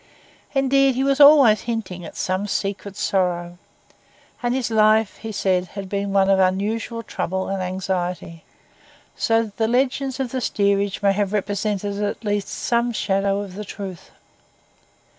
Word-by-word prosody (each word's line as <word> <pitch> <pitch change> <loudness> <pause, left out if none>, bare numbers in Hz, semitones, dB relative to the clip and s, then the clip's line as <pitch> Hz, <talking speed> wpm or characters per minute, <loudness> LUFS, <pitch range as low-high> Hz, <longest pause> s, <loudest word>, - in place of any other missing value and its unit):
Indeed, 270 0 +3
he 265 - 0
was 275 0 +1
always 280 -7 +7
hinting 220 -7 -4
at - - -10
some 185 +2 -2
secret 200 0 -3
sorrow; 175 -3 -1 0.8
and 245 0 0
his 250 -3 -2
life, 215 -1 +3
he 225 - -7
said, 185 -3 0
had 195 -1 -5
been 200 0 -2
one 195 -1 +3
of 195 0 +4
unusual 215 +5 0
trouble 190 -2 -3
and 195 -1 -2
anxiety; 180 -2 -3 0.7
so 225 -1 +1
the 220 - +1
legends 265 +2 0
of 260 -3 -2
the 260 - -2
steerage 200 -2 0
may 200 -1 +4
have 205 0 -1
represented 205 0 -2
at 205 +2 -3
least 205 -1 -1
some 235 0 0
shadow 195 -2 0
of 200 -2 -8
the 210 +3 -6
truth. 195 -3 -8
205 Hz, 150 wpm, -22 LUFS, 190-230 Hz, 0.8 s, always